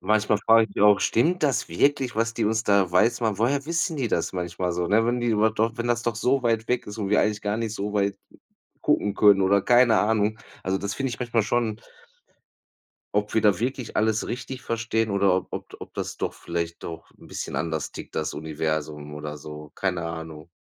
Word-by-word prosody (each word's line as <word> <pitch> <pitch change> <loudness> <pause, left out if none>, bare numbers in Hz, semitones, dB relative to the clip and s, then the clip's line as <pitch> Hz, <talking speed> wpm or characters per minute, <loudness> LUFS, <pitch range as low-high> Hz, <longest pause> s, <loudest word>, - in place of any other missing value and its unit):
manchmal 105 +1 +2
frage 115 +1 +4
ich - - -3
auch: 105 -1 +6
„Stimmt 170 +9 +2
das 140 -4 +1
wirklich, 130 - +1
was 115 +1 +1
die - - 0
uns 110 +1 +1
da 100 -3 +3
weiß 115 +7 +3
machen?“ 110 -4 0
Woher 140 +6 +1
wissen 165 0 0
die 130 -4 -1
das 85 - -1
manchmal 90 0 -2
so, 90 0 -1
ne, 110 +4 +3
wenn 120 0 0
die 120 - -1
überhaupt 110 0 +2
doch 115 +1 +2
wenn 120 0 -2
das 120 -1 +1
doch 120 -1 -1
so 130 +3 +1
weit 115 -1 0
weg 125 0 0
ist 105 +2 -8
und 100 -2 -2
wir 105 - +4
eigentlich 105 -1 0
gar 105 +1 -1
nicht 115 -1 -3
so 105 0 -3
weit 100 -1 +1 0.6
gucken 100 -1 +1
können, 100 -2 +5
oder 100 +1 +4
keine 120 -2 +5
Ahnung. 110 0 +1 0.2
Also, 95 +1 -1
das 100 0 -3
finde 135 -2 -2
ich - - -6
manchmal 115 -2 +1
schon 110 0 -1 1.3
ob 105 0 0
wir 110 - +3
da 105 -4 +3
wirklich 125 0 -3
alles 110 0 +1
richtig 125 +2 -5
verstehen 115 -1 -1
oder 100 -1 +3
ob 95 - -2
ob - - -5
d - - -11
ob - - -10
das - - -5
doch - - -2
vielleicht 85 0 -4
doch 80 -1 -8
'n - - -15
bisschen - - -5
anders 80 -2 -2
tickt, - - -10
das 80 -1 -2
Universum 75 -1 -3
oder 75 0 -6
so, 75 0 -9
keine 90 -3 -2
Ahnung. 80 -1 -7
105 Hz, 220 wpm, -25 LUFS, 90-115 Hz, 1.3 s, auch